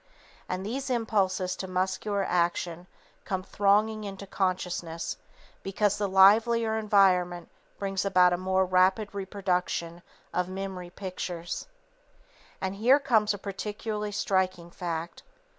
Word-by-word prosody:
_ - - -36 0.5
And 185 +1 -3
these 265 +5 -3
impulses 195 -6 0
to 190 - -5
muscular 190 +2 -1
action 175 -1 -1 0.4
come 185 -1 -3
thronging 210 +3 +2
into 200 -1 -7
consciousness 180 -3 -2 0.4
because 205 +1 0
the 205 - +1
livelier 220 +4 +5
environment 185 -5 +2 0.3
brings 195 -1 -2
about 180 -2 +4
a - - +1
more 190 +1 +1
rapid 185 +3 +2
reproduction 180 -3 -2 0.3
of 180 0 0
memory 190 -2 -5
pictures. 180 - -5 0.9
And 190 +1 -3
here 245 +6 +5
comes 225 -7 +2
a - - -7
particularly 210 +2 -4
striking 185 -4 -1
fact. 170 -1 -5
190 Hz, 120 wpm, -28 LUFS, 180-205 Hz, 0.9 s, livelier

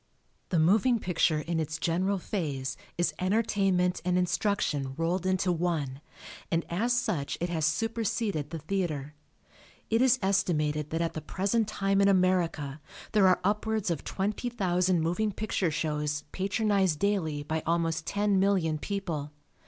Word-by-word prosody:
The 180 - +1
moving 215 +10 +4
picture 170 -5 +1
in 165 +1 -2
its 155 0 -2
general 185 +5 0
phase 145 -9 -3 0.2
is 175 - +1
entertainment 190 -2 +1
and 180 0 +1
instruction 175 -7 0
rolled 175 +3 0
into 185 -1 +1
one 160 -6 -1 0.5
and 165 0 0
as 220 +8 +1
such 210 - -1
it 175 - -1
has 160 -3 +1
superseded 215 -4 -1
the 165 - -5
theatre. 155 -4 -3 0.8
It 225 +2 +3
is 260 0 +5
estimated 150 -6 +1
that 165 +1 -1
at 165 - -2
the 155 - -5
present 200 +7 0
time 195 -2 +1
in 200 - +5
America 175 -7 +1 0.3
there 210 -4 +5
are 185 - +4
upwards 210 0 0
of 160 - -3
20,000 190 -4 0
moving 175 +7 0
picture 200 -3 -1
shows 150 -1 -2
patronized 195 -3 +1
daily 160 -7 0
by 155 +2 -2
almost 165 0 0
ten 205 -1 +2
million 185 -6 +2
people. 165 -7 -3
180 Hz, 145 wpm, -29 LUFS, 160-200 Hz, 0.8 s, is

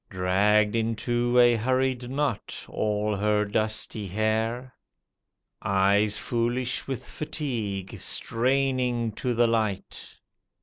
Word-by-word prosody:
Dragged 105 +3 +2
into 120 +2 0
a 120 -1 +6
hurried 130 +1 0
knot 140 -4 -2
all 105 0 -1
her 105 +1 +2
dusty 110 0 -2
hair. 110 +5 -1 0.9
Eyes 100 +2 +2
foolish 120 +2 -1
with 135 -3 -4
fatigue, 110 - -4
straining 125 -1 0
to 120 +3 -2
the 120 +1 +4
light. 110 -4 -2
115 Hz, 95 wpm, -26 LUFS, 105-125 Hz, 0.9 s, a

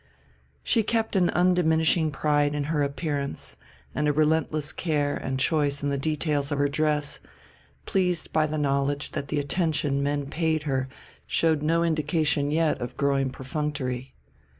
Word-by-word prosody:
She 230 - +2
kept 225 0 -1
an 180 -2 +4
undiminishing 165 -2 +3
pride 145 0 +1
in 145 - -1
her 150 - +1
appearance 140 0 -2 0.4
and 150 - 0
a - - +4
relentless 155 0 +1
care 150 -4 0
and 130 0 -3
choice 145 0 +1
in 145 - +1
the 140 - 0
details 150 -1 0
of 145 - 0
her 145 0 +3
dress, 150 0 0 0.7
pleased 180 -4 0
by 155 -1 +3
the 155 +1 -3
knowledge 140 0 0
that 140 - -4
the 150 - -2
attention 145 -2 0
men 145 0 -1
paid 160 +1 0
her 135 -3 -1 0.4
showed 160 -3 +2
no 165 +2 +2
indication 155 -2 +1
yet 155 -1 +1
of 120 +1 -5
growing 140 -2 +1
perfunctory. 130 -1 -4
150 Hz, 150 wpm, -26 LUFS, 140-160 Hz, 0.7 s, an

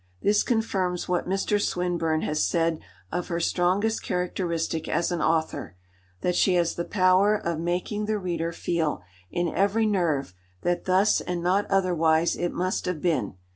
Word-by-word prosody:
This 205 +1 +4
confirms 190 -6 -1
what 180 0 -1
Mr. 195 +2 +1
Swinburne 170 -4 0
has 155 0 0
said 165 -1 +1 0.3
of 175 +1 -2
her 170 -1 -2
strongest 185 +6 +1
characteristic 175 -3 -2
as 170 +3 0
an 175 -3 -1
author, 160 - -1 0.5
that 180 - 0
she 185 0 +3
has 170 -1 +2
the 170 - -3
power 190 +2 +4
of 170 -6 -2
making 180 +5 -2
the 215 0 0
reader 170 -4 -2
feel 165 - -2 0.3
in 175 0 -1
every 200 +6 +1
nerve 165 - 0 0.3
that 175 0 0
thus 190 +3 +3
and 175 -1 -3
not 190 +3 +1
otherwise 170 -4 +2
it 175 - -2
must 185 +1 -2
have 180 -3 -2
been. 155 - 0
175 Hz, 160 wpm, -26 LUFS, 165-190 Hz, 0.5 s, This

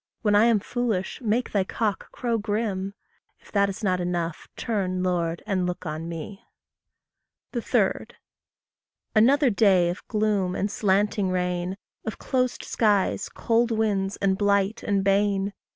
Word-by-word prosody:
When 210 -2 +3
I 205 +2 +6
am 230 -3 +4
foolish, 225 -3 -2
make 235 +2 0
thy 200 -2 +2
cock 210 +1 -2
crow 235 -2 -1
grim; 205 -2 -2 0.4
If - - -20
that 200 -1 +3
is 195 +3 -6
not 185 -2 +1
enough, 175 -2 -3
turn, 185 -5 -1
Lord, 170 -2 -1
and 190 -4 0
look 180 +1 -4
on 155 +1 -4
me. 170 +4 -7 1.1
3. 240 -3 +1 1.1
Another 260 +5 +5
day 195 -5 +4
of 180 - -9
gloom 210 -4 0
and 200 +1 -1
slanting 205 -1 +1
rain! 180 0 -1 0.3
Of 220 - -4
closed 255 -2 -1
skies, 205 -3 +1
cold 235 0 +1
winds, 205 -3 0
and 190 -1 +1
blight 200 +1 +2
and 200 -1 0
bane! 200 0 +2
200 Hz, 140 wpm, -25 LUFS, 185-220 Hz, 1.1 s, I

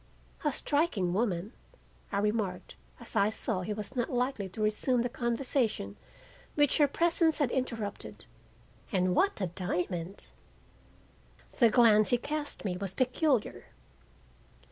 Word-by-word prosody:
"A 295 - +2
striking 275 - 0
woman," 200 0 -1 0.6
I 200 - -1
remarked 205 -3 -1 0.3
as - - -10
I 200 - +4
saw 220 -3 0
he 185 - -4
was 210 +4 -5
not 240 -2 -1
likely 245 -5 -1
to 215 - -7
resume 235 +3 +1
the 245 - -1
conversation 235 - -1 0.6
which 290 +1 +3
her 295 - +6
presence 330 +1 +2
had 285 -6 +1
interrupted. 230 -6 -4 0.7
"And 185 -3 +1
what 395 - +2
a - - +2
diamond!" 180 0 -3 1.3
The 235 -3 +7
glance 215 -2 +5
he 245 - +4
cast 290 0 -4
me 180 -2 -1
was 190 0 -4
peculiar. 255 -1 0
225 Hz, 130 wpm, -30 LUFS, 195-265 Hz, 1.3 s, The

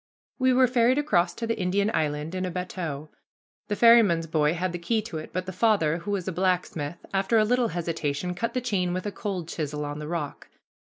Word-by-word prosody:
We 260 0 +4
were 255 +1 +5
ferried 250 +1 +3
across 195 -12 +2
to 230 - -4
the 230 -1 -2
Indian 200 +3 +1
Island 150 +2 -1
in 185 0 -2
a 185 - -1
bateau. 170 -4 -5 0.6
The 205 - -1
ferryman's 215 -8 +6
boy 155 0 +1
had 180 +1 -1
the 175 - -5
key 220 +7 0
to 170 -8 -5
it, 155 - -8
but 185 0 -3
the 185 - -5
father, 185 -5 +2
who 170 - -8
was 195 -3 -2
a - - 0
blacksmith, 175 -3 -1 0.2
after 195 +4 +2
a 215 - +4
little 245 +1 +2
hesitation, 165 -2 -2
cut 230 +8 -3
the 255 - +1
chain 190 -7 0
with 185 - -4
a 205 - -2
cold 190 -5 -4
chisel 150 -3 -3
on 145 +1 -5
the 150 - -6
rock. 155 -4 -4
180 Hz, 220 wpm, -26 LUFS, 165-215 Hz, 0.6 s, ferryman's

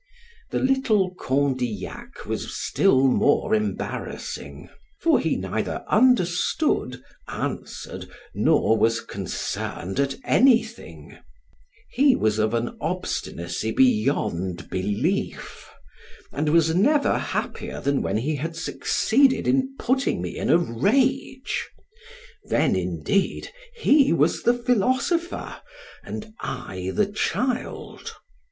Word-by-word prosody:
The - - -2
little 225 -8 +2
Condillac 130 - -2
was - - -4
still 130 - +3
more 145 +10 +2
embarrassing; 215 -1 -4 0.3
for 330 - +3
he - - 0
neither - - -3
understood, 180 - +2 0.2
answered, - - -5 0.2
nor 110 - +3
was 115 +2 +3
concerned 95 +1 -4
at 140 -1 +1
anything; 230 - +1 0.7
he 270 +1 +4
was 110 0 +1
of 110 +1 +1
an 115 +1 -3
obstinacy 85 +6 -3
beyond 105 -8 +1
belief, 100 +2 -2 0.6
and 150 +2 -1
was 160 0 +3
never 280 - +3
happier - - -4
than 140 0 0
when - - -1
he 145 +7 -1
had 165 +4 -4
succeeded 260 +10 +2
in 265 0 +1
putting 265 +2 0
me - - -5
in - - -3
a - - +6
rage; 255 - 0 0.8
then, - - +2
indeed, 90 - -1 0.2
he 295 - +4
was 165 0 +2
the 240 - +3
philosopher, 255 - 0 0.5
and 215 0 -7
I 95 0 -5
the 210 - +2
child. 245 +5 -3
170 Hz, 105 wpm, -24 LUFS, -, 0.8 s, a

